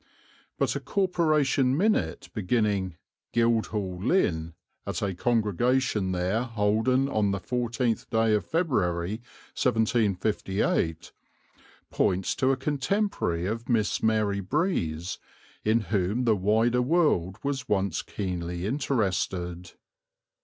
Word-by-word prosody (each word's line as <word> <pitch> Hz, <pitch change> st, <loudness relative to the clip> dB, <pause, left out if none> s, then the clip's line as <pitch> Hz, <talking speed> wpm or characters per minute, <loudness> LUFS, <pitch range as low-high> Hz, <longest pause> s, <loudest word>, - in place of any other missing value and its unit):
But -, -, 0 dB
a -, -, -1 dB
corporation 155 Hz, -8 st, +1 dB
minute 175 Hz, -, 0 dB
beginning, 100 Hz, -3 st, 0 dB, 0.4 s
"Guildhall, 110 Hz, -5 st, 0 dB
Lynn. 85 Hz, -, +1 dB, 0.3 s
At -, -, -3 dB
a 100 Hz, -1 st, 0 dB
congregation 115 Hz, 0 st, +1 dB
there 90 Hz, +5 st, 0 dB
holden 115 Hz, +3 st, +1 dB
on 105 Hz, -6 st, +1 dB
the 100 Hz, 0 st, -1 dB
14th 120 Hz, +1 st, -1 dB
day 110 Hz, -1 st, +2 dB
of 105 Hz, -, +2 dB
February, 105 Hz, -, 0 dB, 0.3 s
1758," 105 Hz, -6 st, 0 dB, 0.8 s
points 95 Hz, +1 st, +1 dB
to 130 Hz, 0 st, +2 dB
a 135 Hz, -, +1 dB
contemporary 145 Hz, -, -1 dB
of 115 Hz, +5 st, -4 dB
Miss 110 Hz, -4 st, +1 dB
Mary 110 Hz, -2 st, +1 dB
Breeze, 95 Hz, -, -1 dB, 0.4 s
in 110 Hz, +2 st, +3 dB
whom 100 Hz, +4 st, 0 dB
the 115 Hz, -3 st, +3 dB
wider 110 Hz, +5 st, +2 dB
world 125 Hz, -, +2 dB
was 140 Hz, -2 st, -3 dB
once 95 Hz, -4 st, +1 dB
keenly 90 Hz, -2 st, -4 dB
interested. 95 Hz, -8 st, -1 dB
110 Hz, 105 wpm, -27 LUFS, 95-125 Hz, 0.8 s, in